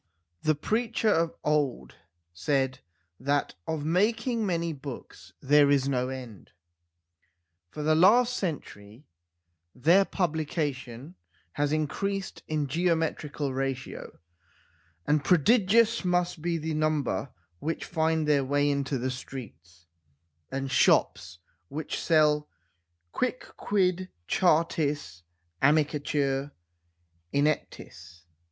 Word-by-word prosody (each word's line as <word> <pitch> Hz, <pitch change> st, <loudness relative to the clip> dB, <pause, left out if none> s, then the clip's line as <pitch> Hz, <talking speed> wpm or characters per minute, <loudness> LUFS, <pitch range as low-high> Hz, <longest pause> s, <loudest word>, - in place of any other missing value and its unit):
The 155 Hz, -, +2 dB
preacher 225 Hz, +7 st, 0 dB
of 165 Hz, -4 st, +1 dB
old 140 Hz, -, 0 dB, 0.4 s
said 130 Hz, -, 0 dB, 0.4 s
that 140 Hz, +3 st, 0 dB
of 155 Hz, -2 st, -3 dB
making 225 Hz, +7 st, +1 dB
many 170 Hz, -2 st, -1 dB
books 135 Hz, -2 st, -10 dB
there 145 Hz, +1 st, +5 dB
is 140 Hz, -1 st, +3 dB
no 125 Hz, -2 st, 0 dB
end. 125 Hz, -6 st, -8 dB, 1.2 s
For 150 Hz, -, -6 dB
the 155 Hz, +1 st, +3 dB
last 235 Hz, +9 st, +5 dB
century 125 Hz, -, -6 dB, 0.7 s
their 170 Hz, +10 st, +5 dB
publication 150 Hz, -, -3 dB, 0.4 s
has 145 Hz, +5 st, -1 dB
increased 195 Hz, +6 st, -2 dB
in 155 Hz, -2 st, -1 dB
geometrical 155 Hz, -2 st, -1 dB
ratio, 135 Hz, 0 st, -4 dB, 0.9 s
and 150 Hz, -1 st, +2 dB
prodigious 220 Hz, -, +4 dB
must 180 Hz, -2 st, 0 dB
be 170 Hz, 0 st, -1 dB
the 160 Hz, 0 st, -3 dB
number 150 Hz, -8 st, 0 dB, 0.3 s
which 160 Hz, +2 st, -3 dB
find 160 Hz, -2 st, 0 dB
their 145 Hz, -2 st, +3 dB
way 145 Hz, +2 st, +1 dB
into 140 Hz, -1 st, -1 dB
the 130 Hz, +1 st, -2 dB
streets 90 Hz, -, -10 dB, 0.7 s
and 135 Hz, 0 st, -3 dB
shops 85 Hz, -, +2 dB, 0.3 s
which 150 Hz, -, -4 dB
sell 150 Hz, -2 st, +3 dB, 0.6 s
quicquid 185 Hz, -7 st, -1 dB, 0.2 s
chartis 150 Hz, -, +1 dB, 0.4 s
amicitur 145 Hz, -1 st, +1 dB, 0.8 s
ineptis. 90 Hz, -, -2 dB
150 Hz, 95 wpm, -28 LUFS, 135-170 Hz, 1.2 s, there